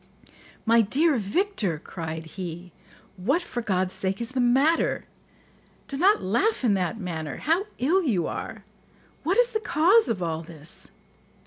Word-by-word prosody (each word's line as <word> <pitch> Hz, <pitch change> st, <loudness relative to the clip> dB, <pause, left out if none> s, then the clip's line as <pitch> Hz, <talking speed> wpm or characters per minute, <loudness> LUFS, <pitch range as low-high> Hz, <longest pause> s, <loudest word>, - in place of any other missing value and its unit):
"My 230 Hz, 0 st, +5 dB
dear 285 Hz, +9 st, +2 dB
Victor," 210 Hz, -, 0 dB
cried 160 Hz, 0 st, -6 dB
he, 175 Hz, +1 st, -7 dB, 0.5 s
"what, 275 Hz, -, +1 dB
for 245 Hz, -, -4 dB
God's 185 Hz, -4 st, 0 dB
sake, 190 Hz, 0 st, -1 dB
is 235 Hz, 0 st, -3 dB
the 260 Hz, -1 st, 0 dB
matter? 270 Hz, +7 st, +2 dB, 0.8 s
Do 275 Hz, -, -5 dB
not 380 Hz, +9 st, +3 dB
laugh 260 Hz, -, +1 dB
in 230 Hz, -5 st, +4 dB
that 190 Hz, +3 st, -1 dB
manner. 160 Hz, -6 st, -4 dB
How 340 Hz, +7 st, 0 dB
ill 330 Hz, +10 st, +2 dB
you 210 Hz, -, +1 dB
are! 215 Hz, -3 st, -5 dB, 0.6 s
What 345 Hz, +6 st, 0 dB
is -, -, +4 dB
the 435 Hz, -, 0 dB
cause 420 Hz, +3 st, +4 dB
of 195 Hz, -6 st, -1 dB
all 160 Hz, -1 st, -2 dB
this?" 160 Hz, -1 st, -8 dB
225 Hz, 150 wpm, -26 LUFS, -, 0.8 s, My